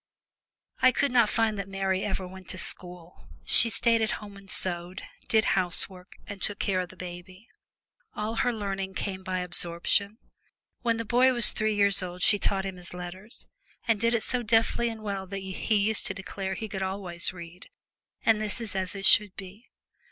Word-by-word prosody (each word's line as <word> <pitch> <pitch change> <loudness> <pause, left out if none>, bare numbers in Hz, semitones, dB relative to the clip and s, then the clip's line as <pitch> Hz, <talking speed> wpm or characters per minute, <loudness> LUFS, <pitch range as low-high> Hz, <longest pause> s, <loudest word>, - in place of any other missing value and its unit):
I 255 - +6
can 280 +2 0
not 235 -4 +5
find 220 -3 0
that 195 0 -5
Mary 195 -1 -1
ever 190 -2 -3
went 185 -1 -12
to - - -5
school. 180 -1 -3 0.2
She 230 - +7
stayed 230 0 +2
at 220 - 0
home 205 -1 -11
and 195 0 -14
sewed, 180 0 +1 0.2
did 220 -1 +3
housework, 180 0 -2
and 200 -1 -9
took 205 - 0
care 190 -2 0
of 180 -1 -3
the 185 - -14
baby. 185 +3 -10 0.7
All 220 +2 -3
her 245 - +2
learning 195 -3 -4
came 190 -1 -4
by 185 -1 -3
absorption. 180 +4 0 0.6
When 230 -2 0
the 230 - -4
boy 255 +4 +4
was 240 -3 +6
three 215 -1 -1
years 200 -1 +3
old 180 0 -5
she 205 - +5
taught 195 -1 0
him 190 -1 -5
his 180 0 -9
letters, 185 +5 -9 0.4
and 225 -3 +2
did 230 +1 +2
it 225 - -1
so 250 -1 -2
deftly 230 +1 +2
and 225 -1 -8
well 195 -2 -4
that 195 +1 -5
he 190 +3 -2
used 210 +1 +2
to 190 - -4
declare 190 0 -5
he 220 - -5
could 195 -2 -6
always 190 -2 0
read 175 0 -12 0.6
and 220 -1 +3
this 215 +3 -1
is 225 -4 -4
as 190 0 -3
it 195 0 -3
should 205 -2 +6
be. 195 +5 -12
195 Hz, 195 wpm, -27 LUFS, 185-220 Hz, 0.7 s, She